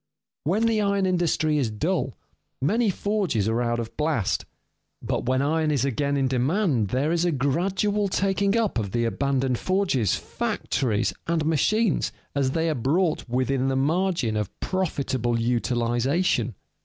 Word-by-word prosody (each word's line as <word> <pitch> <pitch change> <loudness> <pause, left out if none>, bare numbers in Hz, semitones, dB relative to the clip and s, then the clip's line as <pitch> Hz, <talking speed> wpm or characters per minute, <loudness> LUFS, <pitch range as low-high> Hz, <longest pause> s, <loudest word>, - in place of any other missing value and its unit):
When 200 +9 +2
the 225 -2 +2
iron 200 -1 +1
industry 165 -4 +1
is 125 -5 0
dull, 135 - -2 0.4
many 215 - +2
forges 195 - 0
are 115 +2 +1
out 120 -1 0
of 115 -1 -5
blast; 150 -10 0 0.5
but - - -3
when 130 +1 +2
iron 155 +2 +1
is 140 -4 +1
again 140 +2 0
in 135 -1 +2
demand, 130 - +1
there 130 +9 0
is 170 0 +1
a 175 - +2
gradual 190 +9 0
taking 195 +2 +1
up 220 - +1
of 100 -3 -4
the 120 -1 +1
abandoned 135 0 0
forges, 185 - +1
factories, 120 -6 -1
and 165 -2 0
machines 190 +6 +2 0.2
as 140 -2 +1
they 165 +4 0
are 160 - +1
brought 155 +4 0
within 130 +2 0
the 135 - 0
margin 155 - +1
of 105 -3 -1
profitable 130 -10 -1
utilization. 120 - 0
140 Hz, 150 wpm, -25 LUFS, 125-185 Hz, 0.5 s, When